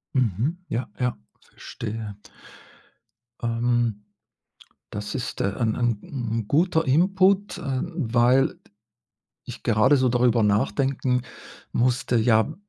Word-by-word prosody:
Mhm. 130 - 0
Ja, 115 +1 -3
ja, 125 -1 -1 0.2
verstehe. 110 -2 -7 1.3
Ähm, 115 -2 0 0.9
das 105 0 -5
ist, 125 - -4
äh, 100 0 0
ein 110 -3 0
ein 120 -4 0
'n 115 -5 -4
guter 165 +1 +2
Input, 190 +7 +3
ähm, 135 +5 -3
weil 125 -1 +2 0.9
ich - - -9
gerade 115 +6 +4
so 130 -1 +2
darüber 120 -1 +3
nachdenken 125 +5 +1 0.5
musste, 125 0 +1
ja, 110 +5 +3
120 Hz, 105 wpm, -24 LUFS, 110-135 Hz, 1.3 s, gerade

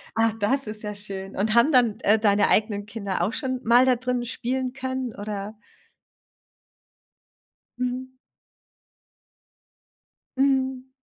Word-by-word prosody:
Ach, 225 -1 +2
das 265 +6 +1
ist 215 0 -6
ja 210 -1 -5
schön. 195 -1 -5
Und 215 +3 0
haben 235 +7 +5
dann 240 -5 +4
d - - -17
äh, 215 +2 +5
deine 205 -1 +3
eigenen 210 -1 +1
Kinder 200 -5 -3
auch 200 +7 0
schon 260 -1 -3
mal 240 +3 +5
da 255 -1 +4
drin 250 0 -2
spielen 255 +2 -3
können, 260 -3 -4
oder 205 0 -5 2.2
Mhm. 250 +1 -3 2.3
Mhm. 265 -1 +1
235 Hz, 125 wpm, -24 LUFS, 210-255 Hz, 2.3 s, haben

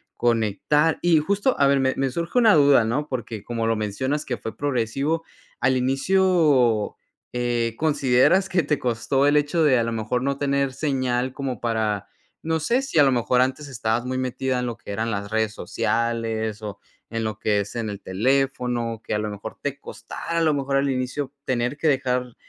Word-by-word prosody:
conectar. 120 +7 +1
Y 175 -2 +4
justo 200 - +1
a 140 - +5
ver, 140 0 +3
me 130 0 +2
me 135 0 +1
surge 170 - -3
una 225 -4 +6
duda, 140 -5 +5
¿no? 135 +7 -1
Porque 115 -4 -5
como 115 -1 -3
lo 115 0 +2
mencionas 130 +8 -2
que 120 - -3
fue 110 - -7
progresivo, 140 +4 -1 0.4
¿al 130 0 +2
inicio, 135 - +2 0.4
eh, 120 -1 0
consideras 145 +4 +3
que 185 -2 +2
te 145 +1 0
costó 125 +3 0
el 145 +1 +4
hecho 150 +3 +1
de 135 -5 +4
a - - +1
lo 115 - -2
mejor 115 +2 -1
no 140 +1 -1
tener 140 -1 0
señal 130 -3 -1
como 130 -3 -4
para, 110 -4 -1 0.3
no 160 0 -1
sé 235 - +1
si 270 -10 -4
a - - +8
lo 135 - +4
mejor 125 0 +2
antes 130 +3 -1
estabas 115 -2 -1
muy 130 0 -2
metida 130 0 -1
en 125 - -2
lo 120 -2 -4
que 110 - -9
eran 110 +3 -2
las 100 -1 -3
redes 110 0 0
sociales, 115 -2 -2
o 100 -2 -6 0.3
en 115 0 -2
lo 110 -1 -3
que 105 -1 +1
es 100 +2 -5
en 115 -2 -2
el 100 -1 -7
teléfono, 120 +1 0
que - - -4
a 105 - +1
lo 105 0 -2
mejor 105 +1 -8
te 145 0 -3
costara 170 - -6
a - - +1
lo 155 -2 +3
mejor 135 0 0
al 140 0 +1
inicio 130 +1 -2
tener 125 +2 -1
que 160 - 0
dejar, 125 -3 0
130 Hz, 200 wpm, -23 LUFS, 115-145 Hz, 0.4 s, a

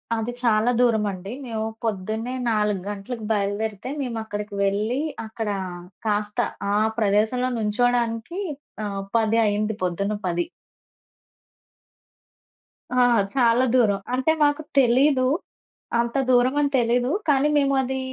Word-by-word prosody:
అది 225 +2 -2
చాలా 230 0 +3
దూరమండి. 210 -4 +1
మేము 220 -2 -3 0.2
పొద్దున్నే 220 +3 -2 0.2
4 210 -3 +1
గంటలకు 210 +3 -5
బయలుదేరితే 205 +2 -1
మేము 240 -4 -3
అక్కడికి 210 -1 -6
వెళ్లి 210 +6 0 0.3
అక్కడ 220 -1 -4 0.6
కాస్త 210 0 -1 0.3
ఆ - - +2 0.2
ప్రదేశంలో 220 +4 +2
నుంచోడానికి 235 - 0 0.5
ఆహ్, 200 -1 -3 0.2
10 225 0 +2
అయింది 210 +1 0
పొద్దున 200 +4 -1
10. 175 -1 0 2.6
ఆ! - - +7 0.3
చాలా 240 0 +4
దూరం. 205 -5 +3
అంటే 260 +5 +2
మాకు 290 +1 +2 0.2
తెలీదు, 260 +2 +4 0.7
అంత 235 +2 -1
దూరమని 260 +4 +3
తెలీదు. 245 +2 +2 0.2
కానీ 280 +1 +4
మేము 275 -1 +2
అది 265 +1 -2
225 Hz, 110 wpm, -24 LUFS, 210-250 Hz, 2.6 s, ఆ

